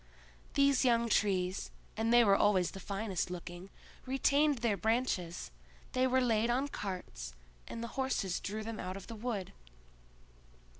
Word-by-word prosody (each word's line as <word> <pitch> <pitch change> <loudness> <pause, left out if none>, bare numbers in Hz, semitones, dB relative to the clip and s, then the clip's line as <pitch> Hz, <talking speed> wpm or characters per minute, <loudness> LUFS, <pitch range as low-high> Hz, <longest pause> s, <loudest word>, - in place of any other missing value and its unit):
These 280 -1 +4
young 235 -2 +3
trees, 190 -3 +1 0.3
and 225 +1 0
they 240 0 +7
were 200 -3 +5
always 190 -3 +3
the 195 - -8
finest 195 -1 -2
looking, 175 +1 -7 0.4
retained 280 +2 +3
their 230 -3 +1
branches; 195 - -1 0.4
they 255 0 +2
were 260 0 +3
laid 230 -2 +2
on 265 +4 +1
carts, 180 - -5 0.3
and 230 - -5
the 235 - -4
horses 220 -9 0
drew 215 +2 -4
them 225 0 -5
out 185 +1 -4
of 195 - -9
the 230 - -8
wood. 215 -4 -3
220 Hz, 150 wpm, -33 LUFS, 190-245 Hz, 0.4 s, they